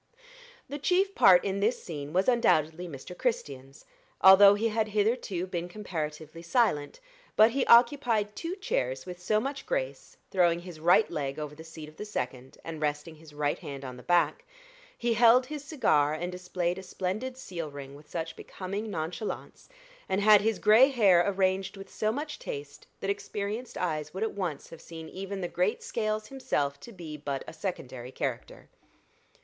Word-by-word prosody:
The 290 +2 -6
chief 380 +6 +2
part 180 - +6
in 195 0 -1
this 215 +5 0
scene 145 -4 -6
was 185 +3 +1
undoubtedly 180 - +2
Mr. 155 +3 -9
Christian's, 140 - -4 0.3
although 200 +1 +9
he 225 +2 0
had 220 0 0
hitherto 210 -3 0
been 175 -1 -4
comparatively 165 -5 -5
silent; 170 - +1 0.4
but 220 +2 +6
he 265 +2 0
occupied 235 -4 +4
two 340 +2 -4
chairs 130 - -2
with 180 -1 -8
so 215 +4 +2
much 275 +4 -5
grace, - - -3
throwing 175 -2 +3
his 175 -3 -10
right 175 +7 +5
leg 140 -3 -3
over 150 -1 -5
the 160 +2 -11
seat 160 -1 -10
of 155 - -15
the 210 - -6
second, 130 -9 -5
and 160 -2 -7
resting 150 +2 -2
his 155 -1 -15
right 145 0 -1
hand 140 -1 -7
on 130 -1 -7
the 125 - -11
back; 175 - +2 0.5
he 235 -1 0
held 235 +2 +6
his 295 +1 -6
cigar 155 - +2
and 175 +3 -4
displayed 180 0 -2
a - - -7
splendid 205 +8 -4
seal 170 - -6
ring 140 -1 -9
with 145 +1 -15
such 165 -1 -4
becoming 200 +4 -6
nonchalance, 180 +4 -5 0.4
and 190 - +1
had 210 0 +7
his 220 0 +1
gray 220 +5 +6
hair 200 -9 +5
arranged 190 0 0
with 195 0 -11
so 215 0 0
much 295 +5 -5
taste, 145 0 -7
that 195 - 0
experienced 205 +4 -4
eyes 155 -2 -2
would 195 - -1
at 225 - -2
once 180 -7 -4
have 165 - -11
seen 160 -1 -9
even 195 +2 -6
the 175 - -1
great 180 +4 -1
Scales 215 -1 -2
himself 145 - -2
to 235 - -11
be 165 -7 -8
but 140 -2 -4
a - - -8
secondary 130 -9 -6
character. - - -5
185 Hz, 175 wpm, -29 LUFS, 155-215 Hz, 0.5 s, although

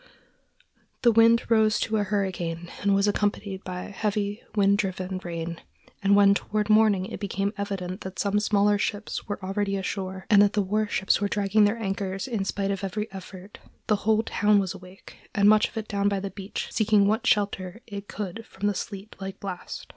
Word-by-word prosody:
The 240 - +6
wind 230 +1 +5
rose 220 -1 +3
to 220 0 0
a 205 - +2
hurricane 180 -4 -2
and 200 -1 +3
was 200 +1 +2
accompanied 205 -1 -1
by 180 0 -5
heavy, 205 0 -2
wind 200 -1 +3
driven 185 -2 -2
rain, 170 -1 -5 0.4
and 200 0 +4
when 200 -1 +6
toward 210 +1 -1
morning 215 -3 +4
it - - -7
became 200 0 -2
evident 195 -1 -4
that 190 0 -7
some 205 0 +1
smaller 205 0 +2
ships 205 +1 -3
were 205 - -3
already 195 +1 -1
ashore, 190 0 -4
and 205 -2 +6
that 205 -1 +4
the 205 - +2
war 210 +3 0
ships 195 -1 +1
were 205 - +2
dragging 205 +1 +3
their 205 +3 +1
anchors 195 -2 -3
in 220 -6 -2
spite 200 0 -1
of 195 0 -3
every 210 +2 -3
effort, 190 +1 -10 0.3
the 210 - +2
whole 220 +2 +2
town 210 -1 +2
was 190 -2 0
awake, 185 +1 -13 0.2
and 200 0 +4
much 215 0 +6
of - - -12
it 220 -1 -3
down 200 -1 +1
by 200 -1 -1
the 195 0 -5
beach 195 0 -5
seeking 210 -2 +3
what 215 +2 +1
shelter 200 0 0
it 200 -2 -7
could 205 +2 -5
from 205 - -6
the 205 - +2
sleet 200 +1 -6
like 195 0 -6
blast. 185 -3 -6
200 Hz, 195 wpm, -26 LUFS, 190-210 Hz, 0.4 s, The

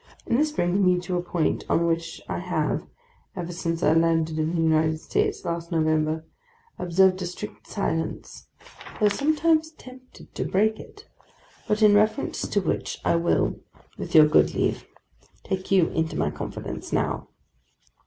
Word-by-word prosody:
And 235 - +1
this 305 0 +2
brings 180 -9 0
me 180 -1 +4
to 180 0 -3
a 175 - 0
point 175 -2 -1
on 170 - +2
which 165 0 -2
I - - -3
have, - - -2 0.5
ever 175 -1 -5
since 165 -1 -3
I 155 - +4
landed 165 -1 +2
in 160 +2 0
the 165 - +1
United 160 0 +2
States - - -1
last 170 0 -4
November, 155 -1 +1 0.5
observed 185 +1 +3
a 180 - -2
strict 210 +4 -8
silence, 160 -5 -4 0.5
though 210 -2 +4
sometimes 310 +6 +2
tempted 255 -3 -15
to - - -2
break 215 +3 +1
it, - - -13 0.6
but 215 +1 +1
in 210 -1 +7
reference 215 +6 +1
to 205 - 0
which - - -2
I - - +3
will, 170 +1 +1 0.4
with - - -6
your 155 -1 +9
good 150 - +3
leave, - - -1 0.6
take 190 -1 -4
you 185 -4 +4
into 160 0 -2
my - - 0
confidence - - -6
now. - - -1
175 Hz, 160 wpm, -25 LUFS, 165-205 Hz, 0.6 s, your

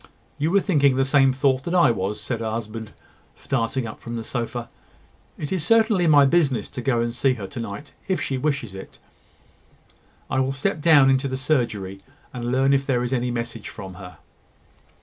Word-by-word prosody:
"You 150 +2 +1
were 200 +3 +3
thinking 140 -9 +3
the 135 0 +2
same 135 -1 +4
thought 130 0 +1
that 175 - -1
I 170 -9 +5
was," 105 0 -3
said 115 +3 -4
her 110 -1 -2
husband, 110 -1 -5 0.4
starting 130 -1 -2
up 110 - -8
from 120 0 -7
the 115 - -4
sofa. 120 0 -4 0.7
"It 145 - -5
is 185 -5 -1
certainly 220 -2 +3
my 145 -3 +7
business 140 -4 +2
to 125 - -6
go 120 -2 +1
and 115 0 -1
see 130 +1 +1
her 105 -5 -6
to 95 +6 -7
night, 115 +6 -7
if 190 -1 0
she 135 - -2
wishes 140 -7 -2
it. 95 - -10 1.3
I - - -1
will 130 +1 0
step 150 +4 -2
down 145 -4 +6
into 135 +1 +1
the 130 -1 -3
surgery, 110 -9 -1 0.3
and 120 -1 -3
learn 135 +2 +3
if 135 0 +1
there 125 -3 +1
is 125 +1 -2
any 125 -1 0
message 120 -2 -4
from 95 -3 -9
her." 90 -3 -11
130 Hz, 195 wpm, -23 LUFS, 115-140 Hz, 1.3 s, my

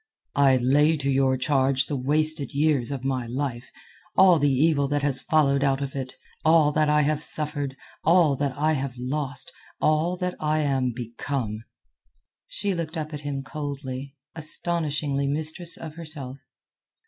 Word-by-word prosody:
"I 135 -2 +5
lay 145 +5 +3
to 140 -1 -1
your 135 -1 +2
charge 135 0 +2
the 145 - -3
wasted 150 +1 +1
years 145 -5 +2
of 135 -3 -4
my 130 -3 -1
life, 125 -1 -4 0.5
all 185 -3 +6
the 145 0 +3
evil 140 +1 +2
that 145 0 -1
has 140 -2 +1
followed 140 -3 +2
out 135 -1 +2
of 140 -1 -5
it, 130 -2 -5 0.3
all 160 -2 +5
that 155 0 +2
I 150 0 +4
have 150 +1 0
suffered, 145 -3 -2 0.3
all 165 -4 +4
that 140 -1 -2
I 155 +2 +2
have 135 -3 -3
lost, 140 +5 -3 0.3
all 160 +4 +1
that 180 0 -2
I 155 0 +1
am 135 -3 +1
become." 115 -1 -4 0.8
She 200 -1 -1
looked 165 -1 -4
up 155 0 -4
at 145 - -5
him 140 -2 -4
coldly, 140 -1 -6 0.2
astonishingly 155 -3 -1
mistress 160 +4 0
of 160 -2 -8
herself. 155 -5 -5
145 Hz, 160 wpm, -25 LUFS, 135-155 Hz, 0.8 s, all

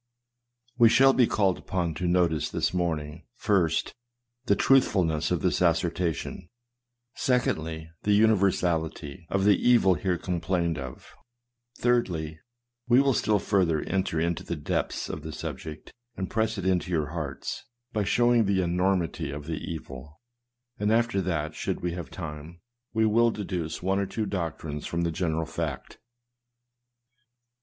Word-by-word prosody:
We 115 -1 +8
shall 135 +3 +6
be 125 -3 +4
called 95 -3 +1
upon 90 -3 -2
to 90 +3 -3
notice, 85 -3 +2
this - - -1
morning, 80 -3 -2
first, 90 -9 +1 0.5
the 100 - +3
truthfulness 90 - +3
of 90 -4 0
this - - +1
assertion; 85 0 0 0.6
secondly, 80 -10 -1
the 105 0 +3
univer 105 -3 +5
sality 80 -2 -3
of 95 0 +1
the 105 -1 +6
evil 120 -6 +5
here 90 0 -1
complained 85 -2 -1
of; 65 -2 -9 0.6
thirdly, 85 -11 0 0.5
we 125 +1 +6
will 135 -1 +3
still 105 -2 +2
further 90 -6 +1
enter 95 -4 -1
into 85 +2 -1
the 85 - -3
depths 75 - -2
of - - -5
the - - -7
subject, 80 -1 -7 0.2
and 95 -1 -4
press 110 -1 0
it 95 - -4 0.2
to - - -9
your 80 -5 0
hearts, 75 -4 -5 0.3
by 105 - +1
showing 120 +2 +3
the 95 -1 +2
enormity 90 -3 0
of 75 0 -6
the 80 0 -4
evil; 75 -1 -9 0.6
and 105 +1 +1
after 115 -3 +2
that, 80 -4 -2
should - - -3
we 90 - -1
have 85 -5 -6
time, 80 +3 -8 0.3
we 110 0 +2
will 115 +2 +4
deduce 90 -7 -4
one 95 +1 +1
or 100 - -1
two 110 +2 -2
doctrines 80 -6 -4
from 85 - -2
the 85 -1 0
general 80 -1 -1
fact. - - -5
90 Hz, 150 wpm, -27 LUFS, 80-100 Hz, 0.6 s, We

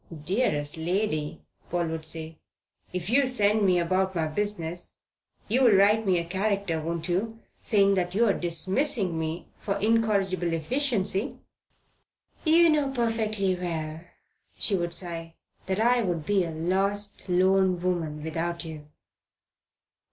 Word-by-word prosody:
"Dearest 160 -8 +1
lady," 160 -2 -2 0.3
Paul 175 -1 -1
would 160 -1 -4
say, 160 0 -4 0.5
"if 180 -1 -4
you 260 +5 +3
send 215 -4 +2
me 185 -2 +4
about 185 +2 0
my 165 -2 +1
business, 175 0 -3 0.5
you'll 250 +2 +4
write 205 +2 +4
me 185 -2 +3
a 170 - -2
character, 195 -2 -1
won't 165 +1 -3
you, 210 +6 -1 0.3
saying 200 -3 +4
that 180 -1 -1
you're 220 -1 +4
dismissing 185 - 0
me 160 +2 -3
for 195 - -2
incorrigible 200 -6 +1
efficiency?" 200 - -1 1.1
"You 335 +1 +5
know 295 -3 +2
perfectly 220 -6 0
well," 165 -3 -4 0.6
she 205 - +2
would 170 -2 -1
sigh, 165 -2 -4 0.3
"that 190 +1 -1
I 240 +2 +3
would 175 -7 -2
be 195 -1 +2
a - - -4
lost, 195 +5 -1
lone 185 0 +3
woman 165 -4 -2
without 170 +2 -3
you." 155 -2 -8
185 Hz, 130 wpm, -27 LUFS, 165-210 Hz, 1.1 s, You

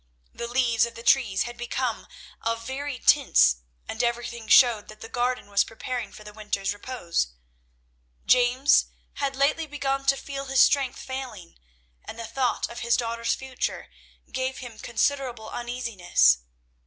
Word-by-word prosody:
The 235 - -5
leaves 235 -2 +2
of 235 - -11
the 230 - -9
trees 235 -6 +3
had 240 0 -8
become 240 0 -3 0.3
of 230 0 -2
varied 270 0 -5
tints, 155 - +5 0.3
and - - -2
everything 235 -1 -2
showed 225 -2 +6
that 215 0 -13
the - - -7
garden 250 0 -1
was 200 0 +3
preparing 240 +1 -5
for 210 - -12
the 210 0 -11
winter's 205 -2 -2
repose. 205 - -2 1.0
James 250 +3 +4 0.3
had 275 -1 -1
lately 290 +4 +1
begun 275 -2 -2
to 275 0 +4
feel 275 0 -6
his 270 -1 +3
strength 275 -3 +3
failing, 250 -10 -7 0.4
and 225 - -9
the 230 - -5
thought 245 +2 -1
of 235 - -8
his 235 0 +2
daughter's 230 -1 -1
future 265 -1 -4 0.4
gave 260 0 -2
him 240 -4 -9
considerable 245 -2 -1
uneasiness. 230 - +2
240 Hz, 150 wpm, -26 LUFS, 225-265 Hz, 1.0 s, showed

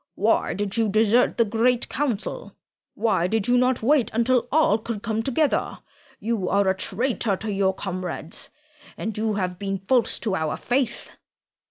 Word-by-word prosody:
Why - - +1
did 205 +1 -2
you 225 -2 +2
desert 220 +4 +3
the 230 - +4
Great 235 +3 +1
Council? 255 -7 -3 0.4
Why 210 -6 +1
did 220 +1 0
you 245 - +4
not 250 -1 +2
wait 275 0 +3
until 245 +2 +2
all 290 -8 +3
could 220 -1 -5
come 225 -1 -1
together? 275 +5 0 0.4
You 215 -4 -1
are 200 -1 +2
a 190 - +3
traitor 220 +2 -1
to 220 +1 -4
your 195 -1 +1
comrades, 185 -4 -5 0.5
and 220 -1 -4
you 215 0 -1
have 180 -2 -2
been 195 -1 -2
false 230 +6 +1
to 210 - -1
our 160 -3 -2
faith." 245 -1 -1
220 Hz, 165 wpm, -24 LUFS, 195-240 Hz, 0.5 s, the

